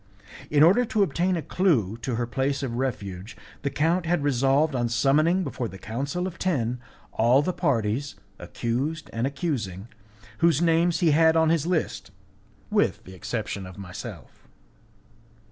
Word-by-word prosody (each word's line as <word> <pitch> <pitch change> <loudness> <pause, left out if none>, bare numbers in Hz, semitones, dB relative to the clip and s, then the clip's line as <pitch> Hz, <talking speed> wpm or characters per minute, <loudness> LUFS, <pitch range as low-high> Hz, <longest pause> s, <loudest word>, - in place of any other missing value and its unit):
In 145 0 +5
order 195 +10 +6
to 220 -3 +1
obtain 180 +2 0
a 160 - -4
clue 130 - +1
to 120 +1 -3
her 120 +1 -1
place 135 +3 -1
of 125 -3 -3
refuge, 100 -6 -4 0.2
the 140 - -1
count 165 +5 0
had 175 -3 +1
resolved 140 +2 +2
on 120 -2 0
summoning 155 +10 +3
before 130 -5 -3
the 95 - -10
Council 140 - -3
of 185 -1 -6
Ten 125 -9 -1 0.3
all 120 +5 +4
the 185 - -1
parties, 135 - -1 0.2
accused 140 +7 -3
and 115 +3 0
accusing, 120 - -3 0.5
whose 170 -4 +4
names 170 0 +2
he 165 -3 +4
had 160 +2 +4
on 160 -1 +4
his 165 -1 +1
list, 175 -3 -1 0.6
with - - +1
the 95 - -12
exception 100 0 -4
of 95 - -12
myself. 90 -2 -9
140 Hz, 155 wpm, -25 LUFS, 115-165 Hz, 0.6 s, order